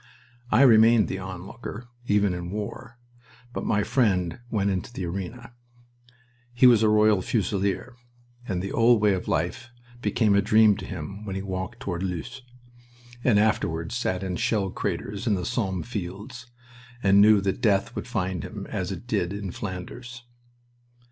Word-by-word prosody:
I 135 - +5
remained 115 -3 +6
the 95 - -3
onlooker, 100 +5 -8 0.2
even 100 -2 +2
in 90 0 -5
war, 105 +4 -6 0.6
but - - -4
my 105 -1 +2
friend 95 -9 +1
went 100 -3 +1
into 95 +5 -3
the 95 -7 -5
arena. 100 +7 -6 1.0
He 120 - +5
was 120 -3 +7
a 110 - +4
Royal 105 -2 +4
Fusilier, 100 +3 -1 0.5
and 90 -1 -2
the 100 - -4
old 120 0 +4
way 105 -1 +3
of 95 - -4
life 85 +10 -2 0.3
became 110 -4 +2
a 100 - +4
dream 110 +1 +5
to - - -7
him 95 +4 -7
when 100 -3 -5
he 95 - -3
walked 95 +5 -5
toward 90 -7 -3
Loos, 95 +8 -4 0.8
and 115 -5 +4
afterward 85 -6 +1
sat 100 -6 -1
in 90 -2 -3
shell 100 -4 0
craters 100 - -4
in 105 - +3
the 90 - -3
Somme 100 -7 -1
fields, 105 +3 -7 0.6
and 100 0 +6
knew 105 0 +7
that 95 +4 -2
death 105 0 +2
would - - -5
find 95 -7 -2
him, - - -7
as 95 +1 -2
it 95 +4 -7
did, 100 -7 -1
in 100 -2 -5
Flanders. 115 +7 -7
100 Hz, 160 wpm, -25 LUFS, 95-115 Hz, 1.0 s, was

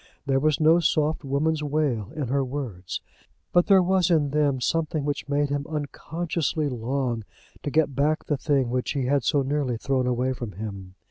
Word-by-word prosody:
There 135 -1 +2
was 155 0 +2
no 160 +2 +5
soft 155 -2 +1
woman's 150 +3 0
wail 145 -8 -1
in 145 -6 -3
her 140 +1 +1
words. 125 -9 -5 0.5
But 175 0 +4
there 195 -2 +6
was 185 -1 +2
in 150 -5 +2
them 145 -3 +2
something 155 +2 0
which 145 -1 -3
made 145 0 +1
him 145 0 -2
unconsciously 155 +1 -2
long 125 -1 -2 0.4
to - - -3
get 150 -1 +2
back 150 +4 +1
the 150 - 0
thing 135 -4 +1
which 125 0 -1
he 135 -3 -1
had 140 0 +2
so 140 -2 +2
nearly 135 -3 -1
thrown 130 +1 0
away 125 +1 +1
from 120 -5 -6
him. 95 -2 -7
140 Hz, 185 wpm, -25 LUFS, 130-155 Hz, 0.5 s, there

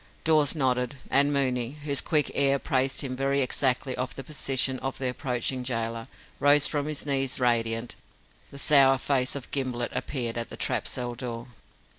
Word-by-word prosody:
Dawes 155 -2 +3
nodded, 125 -2 0 0.2
and 140 +1 +5
Mooney, 130 -1 0
whose 140 -2 +1
quick 150 -3 +1
ear 140 0 +3
apprised 135 -1 0
him 130 -3 -3
very 135 +1 0
exactly 130 0 0
of 125 0 -4
the 135 - -6
position 130 -2 -1
of 135 0 -4
the 130 - -2
approaching 125 0 -2
gaoler, 115 -2 -3 0.3
rose 145 +1 +5
from 145 -1 -1
his 155 -2 -3
knees 135 -2 -1
radiant. 115 -1 0 0.5
The 140 - -11
sour 135 -2 +5
face 130 0 0
of 135 -3 -8
Gimblett 125 -3 -2
appeared 120 -4 -2
at 115 - -5
the - - -8
trap - - -1
cell 120 -1 -3
door. 120 0 -6
130 Hz, 170 wpm, -27 LUFS, 125-140 Hz, 0.5 s, and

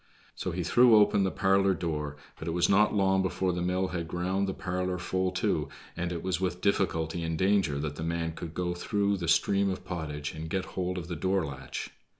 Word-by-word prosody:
So - - -4
he 90 +1 -2
threw 120 +6 +6
open 105 -1 +5
the 95 - +2
parlor 95 0 +3
door, 75 -4 -3 0.2
but 80 - -6
it 85 - -1
was 90 - +3
not 105 +2 +4
long 95 -1 +3
before 95 -1 0
the 90 - -2
mill 90 +1 0
had 85 -2 -3
ground 95 +3 -1
the 95 - -2
parlor 90 0 -2
full 95 +1 -1
too, 90 - 0 0.3
and 90 0 -2
it 85 -1 -4
was 95 -1 -1
with 90 -1 -1
difficulty 85 -4 0
and 80 -1 -2
danger 95 -5 +2
that 75 0 -3
the 80 - -4
man 85 0 -1
could 80 0 -8
go 90 -1 -1
through 100 +3 0
the 85 -2 -4
stream 100 +4 +3
of 95 -1 -4
pottage 75 -5 -4
and 80 0 -6
get 95 +2 -1
hold 90 0 -2
of 85 -2 -5
the 85 - -4
door 95 +2 +1
latch. 70 -2 -6
90 Hz, 220 wpm, -29 LUFS, 85-95 Hz, 0.3 s, threw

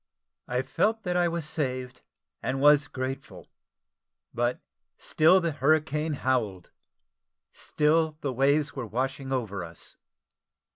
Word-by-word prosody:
I 125 +1 -1
felt 220 +9 0
that 180 0 -1
I 175 -1 +3
was 170 -2 -3
saved, 130 -5 -3 0.4
and 135 +1 -2
was 145 +1 +5
grateful: 130 0 -6 0.9
but 120 +1 0 0.4
still 170 +5 +4
the 170 -2 -1
hurricane 155 +1 +1
howled 120 -10 -1 0.8
still 155 +1 +1
the 135 -3 -2
waves 140 +3 +2
were 130 -4 -4
washing 130 +4 -3
over 105 -8 -2
us. 85 -1 -8
135 Hz, 115 wpm, -27 LUFS, 125-155 Hz, 0.9 s, was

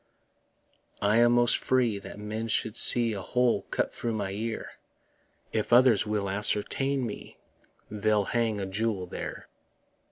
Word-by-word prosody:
I 105 +2 +3
am 120 0 +5
most 120 0 +3
free 120 -5 +1
that 100 - -11
men 110 +2 -5
should 110 -1 -1
see 120 -2 +6
A 100 - -5
hole 125 +4 0
cut - - -2
through 115 - -3
my 100 -3 -3
ear; 110 +3 -5 0.8
If 110 0 -2
others 120 -4 +5
will 105 -2 -1
ascertain 105 +7 -1
me, 105 - -8 0.5
They'll 105 -1 +1
hang 115 -2 -1
a 100 - -3
jewel 100 -1 -2
there. - - -7
110 Hz, 140 wpm, -27 LUFS, 105-120 Hz, 0.8 s, see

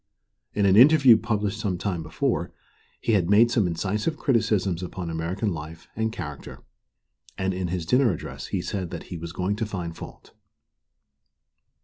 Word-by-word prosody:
In 105 - +2
an 95 -1 +5
interview 135 0 +8
published 105 -2 -1
some 100 -5 -1
time 90 -2 -2
before, 80 -1 -1 0.5
he - - -1
had 95 -5 +2
made 115 +3 +5
some 110 -6 +2
incisive 105 - -2
criticisms 105 - +1
upon 90 -1 -5
American 85 +5 -2
life 80 +1 -8
and 110 0 -1
character, 75 -9 -8 0.7
and 95 0 -1
in 90 0 -2
his 90 -1 -3
dinner 125 +5 +3
address 85 - -6
he - - -2
said 95 -4 -3
that - - -6
he - - -4
was 85 0 -6
going 95 +3 -1
to 110 - -1
find 85 -5 -5
fault. - - -11
95 Hz, 160 wpm, -25 LUFS, 85-110 Hz, 0.7 s, interview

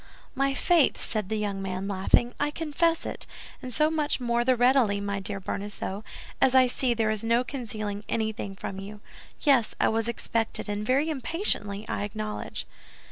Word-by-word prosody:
"My 275 0 +1
faith!" 340 -3 +3
said 210 -3 -2
the 220 - 0
young 200 -2 -2
man, 190 0 -3
laughing, 200 +5 +2
"I 290 - +2
confess 325 +2 0
it, - - -3 0.3
and 255 -2 -6
so 305 +5 +2
much 300 -3 0
more 235 -1 +1
the 255 +1 +4
readily, 245 -4 +4
my 200 0 -2
dear 195 +1 -2
Bonacieux, 200 +1 -4 0.4
as 265 -1 +5
I 260 -1 +8
see 250 0 +1
there 220 -1 +1
is 215 -1 -1
no 230 +2 +3
concealing 215 -6 -4
anything 220 -3 -2
from 195 0 -5
you. 205 +2 -8 0.4
Yes, 270 -7 +3
I - - +4
was 225 0 0
expected, 230 -1 -1
and 205 0 -2
very 275 +8 +2
impatiently, 240 - -1
I - - -2
acknowledge." 215 +1 -4
225 Hz, 175 wpm, -27 LUFS, 205-265 Hz, 0.4 s, I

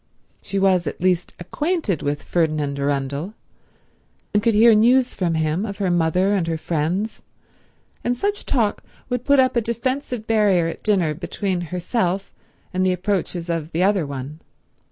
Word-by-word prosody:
She 200 - -4
was 190 -4 +3
at - - -4
least 180 -1 0
acquainted 290 - -1
with 145 0 -2
Ferdinand 155 -4 0
Arundel, 140 +7 -2 1.0
and 205 - +3
could 230 0 +2
hear 225 +2 +7
news 245 +4 +4
from 170 -3 -1
him 160 +4 0
of 200 -3 -5
her 195 -3 0
mother 175 +3 +2
and 185 -5 0
her 165 -1 -1
friends, 170 +7 -2 0.8
and 245 +1 0
such 405 +7 -2
talk 225 -6 0 0.3
would 245 -1 -2
put 280 -1 +4
up 260 0 +3
a 235 - +3
defensive 240 +1 -2
barrier 205 -6 +3
at 165 - -4
dinner 185 -7 +2
between 180 +3 -3
herself 180 +1 -1 0.4
and 185 0 +1
the 185 - +3
approaches 180 -2 -2
of 165 -2 -3
the 170 +3 +1
other 190 -5 +2
one. 140 +2 -6
185 Hz, 160 wpm, -22 LUFS, 165-220 Hz, 1.0 s, hear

